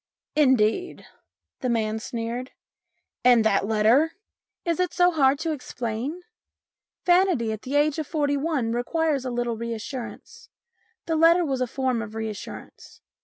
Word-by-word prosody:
"Indeed?" 260 +3 +2 0.5
the 255 - -2
man 220 -2 0
sneered. 235 +3 -5 0.7
"And 245 -2 +6
that 200 -2 +2
letter? 225 +9 +3 0.3
" - - -64
"Is 335 -1 0
it 365 -1 0
so 355 0 +4
hard 280 -4 +3
to 325 0 -1
explain? 255 +3 -4 0.8
Vanity 350 - +3
at 215 -1 -5
the 270 +3 -4
age 295 +1 +2
of 310 - -3
forty 290 -3 0
one 280 -5 -1
requires 280 +3 0
a - - -1
little 240 -1 -2
reassurance. 235 +2 -7 0.6
The 325 - 0
letter 335 +2 +5
was 265 -3 -2
a 255 - +1
form 255 -2 -1
of 215 -1 -8
reassurance. 220 -2 -7
260 Hz, 145 wpm, -25 LUFS, 230-315 Hz, 0.8 s, And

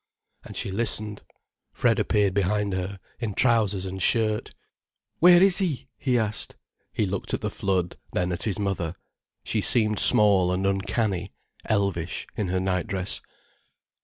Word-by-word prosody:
And - - -10
she - - -3
listened. 105 0 -1 0.5
Fred - - +1
appeared 100 -2 +1
behind 100 +1 0
her, 95 +1 -4 0.2
in 110 -5 -4
trousers 105 -6 +1
and 95 0 -6
shirt. 110 0 0 0.7
"Where 175 +2 +7
is 195 -1 +4
he?" 160 -9 -3
he 125 -3 0
asked. 110 -2 -3 0.4
He 105 - -1
looked 95 0 -3
at - - -7
the - - -3
flood, 90 -3 -2 0.2
then 90 0 -1
at 85 - -4
his 105 -4 +1
mother. 95 -5 -3 0.5
She - - -1
seemed 105 -3 +3
small 100 -4 +7
and 95 +1 -1
uncanny, 95 -1 -1 0.3
elvish, 100 -6 -1
in 105 - -2
her 95 +1 -1
nightdress. 95 0 -2
100 Hz, 145 wpm, -25 LUFS, 95-110 Hz, 0.7 s, Where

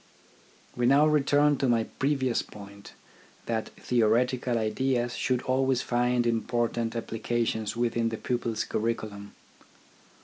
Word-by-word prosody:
We 120 0 +1
now 140 +3 +5
return 145 -1 +3
to 135 - 0
my 115 -2 +3
previous 130 -1 0
point, 100 -1 -12 0.5
that 110 -1 -2
theoretical 120 +1 +1
ideas 120 +2 0
should 125 -2 0
always 130 0 +1
find 120 0 +1
important 115 0 -1
applications 115 -1 -2
within 115 -1 0
the 110 - -4
pupil's 120 -2 -2
curriculum. 105 -2 -4
120 Hz, 110 wpm, -27 LUFS, 115-130 Hz, 0.5 s, now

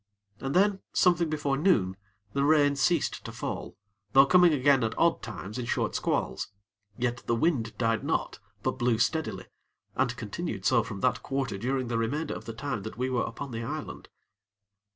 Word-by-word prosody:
And 135 +1 -3
then, 195 +1 +4
something 175 -3 +3
before 145 -3 0
noon, 135 - +2 0.4
the 140 - +1
rain 145 -1 +4
ceased 160 +3 +1
to - - -6
fall, - - -5 0.4
though 135 +1 +8
coming 180 +3 +6
again 140 -3 +4
at 110 0 -2
odd 170 0 +3
times 105 0 -6
in 120 - -4
short - - 0
squalls; 65 - -1 0.5
yet 120 0 0
the 115 - +2
wind 120 -5 0
died 115 -2 +1
not, - - -1 0.2
but - - -1
blew 120 -2 +2
steadily, 110 - -1 0.5
and 125 -2 0
continued 110 - -5
so 120 +1 +4
from 110 -3 -7
that 125 -1 +1
quarter 135 -7 -2
during 130 +3 -1
the 115 -1 -1
remainder 145 +7 -1
of - - -8
the 115 - -5
time 125 -2 -3
that 110 +3 -7
we 130 +1 -1
were 125 - +1
upon 140 -2 -6
the 115 0 -4
island. 115 - -6
130 Hz, 180 wpm, -28 LUFS, 115-145 Hz, 0.5 s, though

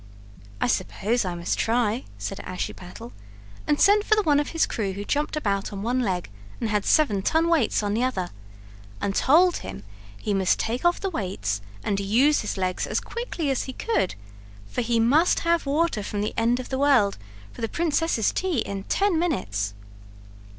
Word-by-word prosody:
"I - - +1
suppose 215 +4 0
I 180 -1 -2
must 170 0 -2
try," 230 0 +1
said 100 0 -5
Ashiepattle, 105 - -6 0.6
and 295 - +2
sent 410 +1 +5
for 430 - +3
the 425 - +2
one 295 -4 +4
of 295 - -1
his 330 - +2
crew 200 -4 -2
who 200 +2 -6
jumped 295 +5 -1
about 200 -9 -1
on 200 -1 -5
one 245 +3 0
leg 185 - -1 0.3
and 225 - -2
had 210 -1 0
seven 220 -11 +3
ton 320 - +2
weights 315 -10 +2
on 205 0 0
the 225 - 0
other, 190 -9 -1 0.7
and 200 - -1
told 345 - +4
him 95 +1 -8 0.3
he 205 - -2
must 190 -2 +2
take 235 +3 -2
off 345 0 +3
the 390 - -2
weights 105 - -2 0.2
and 200 -1 0
use 240 +10 +3
his 210 - -4
legs 185 -1 -1
as - - 0
quickly 360 - -3
as 265 - -1
he 260 - -6
could, 440 - -1 0.5
for 100 - -3
he 235 0 +1
must 290 +10 +4
have 335 -3 +1
water 300 -4 +1
from 205 +1 -3
the 210 - -2
end 235 +2 +2
of 255 - -6
the 265 - -2
world 255 - +3 0.3
for - - -11
the 225 - -1
princess's 325 -8 +1
tea 370 -5 -1
in 195 -2 -5
ten 395 -5 +1
minutes. 100 - -1
230 Hz, 190 wpm, -25 LUFS, 195-305 Hz, 0.7 s, sent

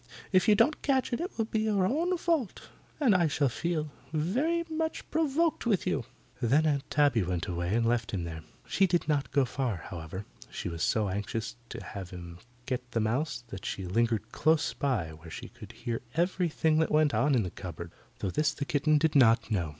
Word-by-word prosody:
If 185 -2 +4
you 210 - +7
don't 235 +8 +3
catch 265 -3 +1
it, - - 0
it 360 - -2
will 225 - +1
be 220 0 -1
your 210 -3 +2
own 335 - +1
fault, 330 - -1 0.3
and 260 -8 +4
I 175 -3 +4
shall 145 -2 +1
feel 155 +3 -2 0.2
very 255 - +1
much 320 0 -3
provoked 320 -2 +1
with 205 -6 +2
you." 130 -4 0 0.4
Then 135 +6 +3
Aunt 145 -3 0
Tabby 145 -6 +3
went 90 -2 -1
away 85 +2 -1
and 115 0 +2
left 115 -2 +1
him 95 -3 -2
there. 80 -1 -6 0.2
She 195 - +3
did 175 -3 +1
not 145 -3 +1
go 140 -1 +3
very 125 - -6
far, 130 -5 0 0.2
however. 85 +3 -6 0.2
She - - -4
was 85 -1 -6
so 110 -2 +2
anxious 105 +3 -3
to - - -7
have 95 -3 -7
him 85 -1 -9 0.3
get 125 -1 -4
the 115 - +1
mouse 120 +3 -1
that 95 -3 -7
she 95 - -4
lingered 115 +3 0
close 155 -1 +2
by 125 - 0
where 80 +1 -12
she - - -7
could - - -12
hear 115 -1 -4
everything 165 -2 +2
that 160 - +2
went 150 -1 +3
on 145 -1 +3
in 115 - +3
the 90 - -4
cupboard 85 -2 -7 0.3
though 95 - -1
this 150 +5 +1
the 140 - -3
kitten 150 +2 +3
did 155 0 +1
not 115 -4 +5
know. 90 -7 0
140 Hz, 210 wpm, -29 LUFS, -, 0.4 s, you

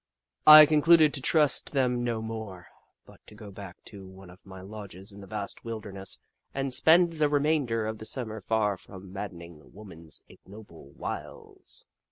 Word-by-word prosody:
I 155 0 +12
concluded 155 0 +4
to 135 - -2
trust 150 0 +1
them 125 -3 0
no 115 -2 -2
more, 110 -5 -7 0.4
but - - -18
to - - -14
go 105 -1 -11
back 95 -2 -11
to 100 -2 -11
one 95 -1 -14
of 95 +2 -19
my 95 -1 -11
lodges 100 0 -10
in 100 0 -12
the 100 - -12
vast 100 0 -7
wilderness 105 -4 -6 0.3
and 135 -1 -2
spend 170 +4 +4
the 155 -2 +1
remainder 145 -6 0
of 110 0 -5
the 110 - -7
Summer 110 -3 -5
far 105 -1 0
from 95 +1 -13
madden 95 -3 -7
ing 85 -3 -15
woman's 85 -7 -10
ignoble 95 -8 -15
wiles. - - -9
110 Hz, 170 wpm, -27 LUFS, 95-130 Hz, 0.4 s, I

